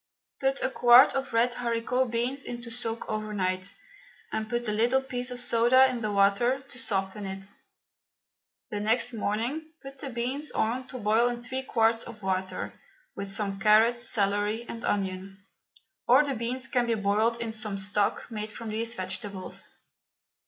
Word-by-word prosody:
Put 270 0 0
a - - +2
quart 245 +1 +7
of 270 0 -2
red 235 +1 +2
haricot 245 +1 0
beans 245 +4 -1
into 240 -1 -6
soak 230 -1 -4
overnight, 200 -3 -2 0.6
and 220 0 -3
put 240 0 -2
a - - +2
little 240 +5 +3
piece 250 -1 -3
of 250 0 -4
soda 245 +2 +5
in 245 -2 -4
the 215 -1 -1
water 205 +6 +3
to 250 - -6
soften 195 -3 -2
it. 195 0 -6 1.3
The 210 - -2
next 225 +4 +1
morning 235 +9 -2
put 270 0 -10
the 275 - -4
beans 255 +5 -3
on 250 +4 -1
to 255 - -6
boil 225 +1 +3
in 240 0 -3
three 260 +2 -3
quarts 230 -3 +2
of 230 -3 -11
water, 190 0 -2 0.4
with 200 - -4
some 195 0 -1
carrot, 220 +4 +5
celery 210 0 0
and 230 0 -7
onion, 195 0 -3 0.6
or 260 +5 +7
the 280 - -1
beans 245 +1 -2
can 245 -1 +1
be 230 - +2
boiled 215 +3 +1
in 230 -1 -2
some 215 -2 -2
stock 200 +1 0
made 215 -1 -4
from 225 +1 -7
these 225 +2 -2
vegetables. 190 0 -3
230 Hz, 165 wpm, -28 LUFS, 205-245 Hz, 1.3 s, quart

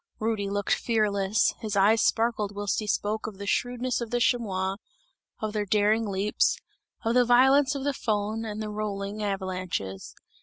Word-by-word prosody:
Rudy 215 -2 -1
looked 205 0 0
fearless, 210 -3 +1
his 215 -3 -4
eyes 210 +3 +4
sparkled 220 -3 +1
whilst 205 0 -1
he 215 - -5
spoke 210 +1 -1
of 210 -3 -8
the 200 - -6
shrewdness 245 +3 -1
of 235 - -4
the 245 +1 0
chamois, 195 -6 0 0.6
of 215 -1 -3
their 210 -1 -2
daring 215 +2 +2
leaps, 200 +1 +1 0.5
of 225 - +2
the 250 0 +5
violence 265 +4 +5
of 275 - -3
the 285 - +1
Föhn 215 -4 -1
and 225 0 -4
of - - -4
the 215 - -4
rolling 210 0 -4
avalanches. 185 - -4
215 Hz, 175 wpm, -27 LUFS, 200-230 Hz, 0.6 s, the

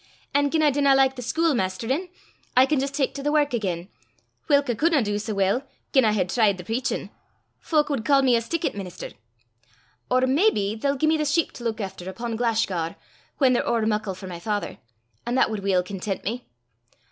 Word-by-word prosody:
An' 285 0 +3
gien 315 +1 +1
I 295 - +5
dinna 280 0 +4
like 265 0 +3
the 250 - -6
schuilmaisterin', 260 - 0 0.5
I 255 - +8
can 285 +1 +1
jist 275 +1 -2
tak 275 -3 0
to 280 - -6
the 295 +1 0
wark 295 -3 +2
again, 185 -6 -2 0.6
whilk 285 -1 +3
I 240 - +1
cudna 305 +2 +2
dee 205 0 -1
sae 215 +1 -4
weel 195 +5 +1 0.3
gien 265 -3 +5
I 215 - +3
had 185 -3 0
tried 215 -5 +3
the 180 - -8
preachin': 235 +7 -2 0.5
fowk 300 -2 +1
wad 275 -6 -2
ca' 275 0 +4
me 255 -2 +4
a 230 - +2
stickit 335 +7 -2
minister! 190 -3 -7 1.0
Or 255 - +3
maybe 260 - +2
they'll 275 +5 -1
gie 310 - +1
me 315 +1 +3
the 305 - -1
sheep 320 +3 +1
to 240 - -11
luik 230 -1 -2
efter 190 -2 -6
upo' 230 +4 -4
Glashgar, 220 -8 0 0.4
whan 265 -3 +4
they're 245 - 0
ower 230 -2 +1
muckle 210 -3 -1
for 190 - -10
my 175 -2 -7
father, 205 +3 -3 0.5
an' 240 - 0
that 260 - +3
wad 215 - -2
weel 190 -2 +1
content 195 +1 -4
me. 240 +4 -4
240 Hz, 205 wpm, -24 LUFS, 205-280 Hz, 1.0 s, I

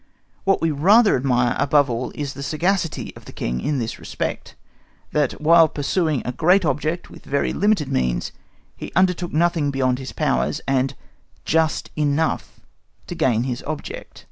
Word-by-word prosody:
What 195 0 +2
we 165 - +2
rather 200 +10 +5
admire 125 -2 +1
above 145 0 +3
all 120 0 -3
is 140 -2 -4
the 140 - -8
sagacity 165 +3 -1
of - - -14
the - - -10
King 60 +1 -3
in 150 - -1
this 115 -3 -4
respect, - - -5 0.6
that 145 -3 +1
while 165 +1 +6
pursuing 155 0 -1
a 125 - -1
great 175 +8 +3
object 155 +4 -2
with - - -13
very 140 +1 -1
limited 205 -7 +1
means, 60 -1 0 0.4
he - - -8
undertook 180 -2 +2
nothing 165 -2 +1
beyond 130 -2 0
his 130 - -6
powers, 65 +4 0
and 135 -1 +1 0.5
just 160 0 +1
enough 150 +1 -1 0.4
to - - -6
gain 120 -3 +1
his 125 0 -3
object. 155 -1 -6
145 Hz, 160 wpm, -22 LUFS, 130-165 Hz, 0.6 s, while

